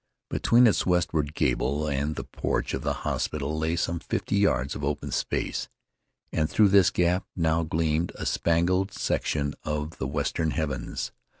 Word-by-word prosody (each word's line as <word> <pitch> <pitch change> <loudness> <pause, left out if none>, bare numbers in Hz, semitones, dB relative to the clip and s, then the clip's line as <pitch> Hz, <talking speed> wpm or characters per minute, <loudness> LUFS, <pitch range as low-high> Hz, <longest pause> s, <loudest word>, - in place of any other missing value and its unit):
Between 120 +2 +5
its 110 - +4
westward 80 -4 +1
gable 70 +4 0
end 70 -2 0
and 75 +2 -2
the - - -4
porch - - -2
of - - -2
the - - 0
hospital 75 0 -1
lay 80 +1 0
some 85 0 -1
fifty - - -2
yards 70 -10 +2
of 75 - -6
open 70 +1 -2
space, - - -1 0.6
and 80 -1 0
through 105 -2 +4
this 95 -4 +6
gap 90 +1 +1
now 80 -1 +2
gleamed 80 +1 0
a - - -5
spangled 90 +4 +1
section 70 -6 -1
of 75 +1 -3
the 65 - -1
western 75 +3 -1
heavens. 75 -4 -3
80 Hz, 165 wpm, -27 LUFS, 75-85 Hz, 0.6 s, this